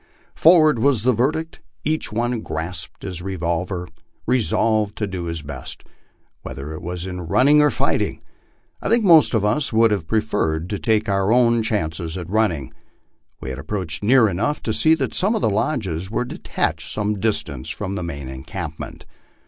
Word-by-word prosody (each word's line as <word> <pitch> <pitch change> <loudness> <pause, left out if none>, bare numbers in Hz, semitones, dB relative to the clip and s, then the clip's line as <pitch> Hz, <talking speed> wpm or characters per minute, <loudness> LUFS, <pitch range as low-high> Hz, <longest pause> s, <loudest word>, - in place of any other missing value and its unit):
Forward 155 -6 +5
was 125 -3 +3
the 130 +1 +4
verdict. 155 +7 -1 0.2
Each 155 -8 -1
one 120 +2 -1
grasped 80 -2 -5
his 90 -2 -4
revolver, 90 0 -2 0.4
resolved 110 -3 +1
to 105 - -1
do 95 -3 -5
nis 85 -2 -4
best, 70 -2 -8 0.6
whether 70 +3 -7
it 80 - -7
was 90 +1 -4
in 90 -1 -5
running 145 - +5
or 150 - +5
fighting. - - 0 0.6
I - - -2
think 230 +1 +4
most 165 - +6
of 105 -2 +1
us 130 +6 +1
would 115 0 +4
have 95 -6 -1
preferred 90 -6 -1
to 100 - -2
take 110 -2 +1
our 100 +1 +1
own 120 -1 +4
chances 85 -5 -2
at 90 0 -7
running. 90 - 0 0.7
We 65 - -5
had 65 - -6
approached 80 +1 -3
near 120 +1 +5
enough 105 +11 -1
to 110 - -1
see 160 +7 +4
that 135 -5 -2
some 205 +5 +1
of - - -1
the 110 - +3
lodges 95 - -1
were 115 +3 -1
detached 80 -8 -3
some 105 -1 -1
distance 95 - -2
from 95 - -4
the 100 - -3
main 70 -6 -5
encampment. 65 0 -7
105 Hz, 175 wpm, -21 LUFS, 85-120 Hz, 0.7 s, most